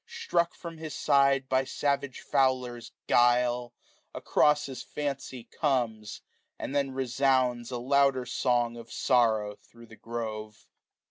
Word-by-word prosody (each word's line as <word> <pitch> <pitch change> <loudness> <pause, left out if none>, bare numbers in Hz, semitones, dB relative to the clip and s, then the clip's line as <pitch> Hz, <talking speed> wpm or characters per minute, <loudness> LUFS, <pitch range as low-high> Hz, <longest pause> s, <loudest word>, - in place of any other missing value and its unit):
Struck 170 -1 -1
from 165 -2 -9
his 155 -1 -6
side 140 -1 +3
by 130 0 +2
savage 140 0 -2
fowler's 125 -3 0
guile. 120 0 +2 0.4
Across 150 0 +2
his 135 -2 -7
hncy 135 -4 -5
comes; 120 -8 -1 0.4
and - - -5
then 140 -1 +1
resounds 130 -2 +1
620 125 - -4
A 120 +1 -6
louder 140 -2 +3
song 120 -2 0
of 115 0 -11
sorrow 110 -5 +2
thro* 115 0 -17
the 110 - -15
grove. 110 -2 -6
125 Hz, 130 wpm, -28 LUFS, 120-140 Hz, 0.4 s, side